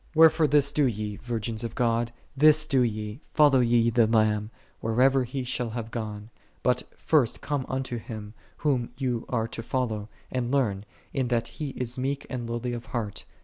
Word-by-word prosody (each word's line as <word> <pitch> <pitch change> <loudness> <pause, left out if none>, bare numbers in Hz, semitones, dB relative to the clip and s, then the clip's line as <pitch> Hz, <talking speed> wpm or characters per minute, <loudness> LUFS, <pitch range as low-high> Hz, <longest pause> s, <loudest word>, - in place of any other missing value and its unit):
53. 160 - -2
Wherefore 160 -1 +7
this 145 -1 +4
do 150 - +2
ye, 105 -3 -3
virgins 115 -1 -4
of 115 -1 -5
God, 115 -1 +1 0.2
this 155 +2 +6
do 140 -4 +2
ye: 110 +1 -2
follow 145 -3 +6
ye 115 -1 +3
the 115 -1 +4
Lamb, 110 -1 +2 0.3
whithersoever 130 +4 +3
He 130 +2 -4
shall 125 -1 -2
have 115 0 -5
gone. 110 -1 -5 0.3
But 125 0 +2 0.2
first 145 -8 +2
come 140 -3 -2
unto 130 -2 -2
Him, 110 -2 -8 0.2
Whom 130 -6 0
ye 125 -4 -1
are 115 -3 0
to 115 - -5
follow, 110 -3 -2 0.2
and 125 -1 -1
learn, 110 -8 +1 0.3
in 130 -2 0
that 120 -2 0
He 150 -3 -5
is 125 0 -3
meek 140 +2 -2
and 120 -2 -4
lowly 120 +1 -2
of 120 -1 -6
heart. 110 -5 -4
120 Hz, 185 wpm, -27 LUFS, 115-135 Hz, 0.3 s, Wherefore